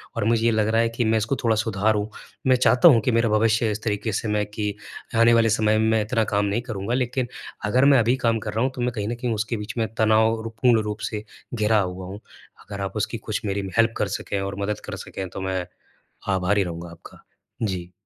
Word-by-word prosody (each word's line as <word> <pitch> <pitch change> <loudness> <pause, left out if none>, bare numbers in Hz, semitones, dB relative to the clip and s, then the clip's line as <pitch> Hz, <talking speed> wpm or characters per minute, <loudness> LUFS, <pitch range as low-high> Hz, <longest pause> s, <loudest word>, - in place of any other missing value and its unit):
और 115 - -1
मुझे 115 0 +2
ये 115 - +4
लग 110 -1 +1
रहा 115 +1 +3
है 115 - +1
कि 115 +1 -1
मैं 110 0 +3
इसको 110 +5 0
थोड़ा 115 -2 +3
सुधारूँ। 105 -1 0 0.4
मैं 130 - +6
चाहता 125 +4 +5
हूँ 125 -9 +7
कि 125 - +1
मेरा 115 0 +2
भविष्य 110 +1 +3 0.2
इस 105 +1 -4
तरीके 110 +1 -1
से 110 - -2
मैं 105 0 0
कि 105 -1 -3 0.4
आने 115 +1 +5
वाले 115 -1 +4
समय 110 0 +2
में, 110 0 +2
मैं 110 -1 +3
इतना 115 +1 0
काम 100 0 +2
नहीं 100 +4 0
करूँगा 110 -2 -4
लेकिन 125 0 -1 0.4
अगर 125 +6 +3
मैं 140 -2 +6
अभी 120 +2 +3
काम 115 -1 +2
कर - - -5
रहा 110 +2 0
हूँ 130 - +1
तो 125 - -4
मैं 125 +1 0
कहीं 105 -2 -2
न 120 - -2
कहीं 120 0 -2
उसके 110 +2 -2
बीच 105 0 -6
में 115 -1 +1
तनावपूर्ण 110 +1 +2
रूप 105 0 -4
से 105 -1 -5 0.3
घिरा 110 -1 +2
हुआ 90 -1 -3
हूँ। 100 +2 -8 0.4
अगर 100 -1 -7
आप 95 +1 -4
उसकी 105 +2 -2
कुछ 110 -1 -4
मेरी 100 -1 -2
हेल्प 115 0 +4
कर - - 0
सकें 100 - -4
और 100 0 -4
मदद 100 0 -2
कर - - -5
सकें 95 - -6
तो 95 - -7
मैं 95 -1 -2 0.7
आभारी 95 +2 +2
रहूँगा 85 -1 -6
आपका, 85 - -14 0.4
जी। 90 -4 -3
110 Hz, 235 wpm, -23 LUFS, 105-115 Hz, 0.7 s, हूँ